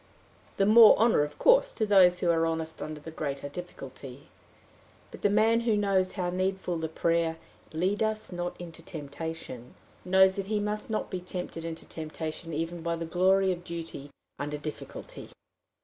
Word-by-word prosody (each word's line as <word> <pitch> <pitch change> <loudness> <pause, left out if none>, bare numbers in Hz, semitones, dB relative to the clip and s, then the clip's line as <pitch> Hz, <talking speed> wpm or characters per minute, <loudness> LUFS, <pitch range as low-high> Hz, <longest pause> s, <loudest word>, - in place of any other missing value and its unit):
The 195 - +3
more 220 +1 +8
honor, 225 -8 +4
of 150 0 -3
course, - - +5
to 220 - 0
those 185 -3 +5
who 175 - +3
are 165 0 +2
honest 160 0 -3
under 155 -1 -5
the 160 +2 -9
greater 145 -3 -4
difficulty! 140 -4 -9 0.8
But - - -11
the 205 - +3
man 220 +3 +4
who 230 -2 +1
knows 195 -2 +1
how 180 -3 -2
needful 185 -1 -1
the 160 -1 -3
prayer, 165 0 0 0.3
"Lead 185 +6 -1
us 220 -1 +1
not 175 0 -4
into 170 -2 -9
temptation," 145 -5 -7 0.3
knows 190 +1 +4
that 195 -1 -3
he 215 0 0
must 210 +1 -2
not 215 - -2
be 185 -2 -3
tempted 180 -2 -6
into 165 -1 -6
temptation 160 +1 -6
even 165 +2 -3
by 170 0 -1
the 165 0 -4
glory 190 +3 +3
of 175 -1 -5
duty 165 -5 -7 0.3
under 145 +1 -3
difficulty. 150 +1 -8
175 Hz, 170 wpm, -28 LUFS, 160-195 Hz, 0.8 s, more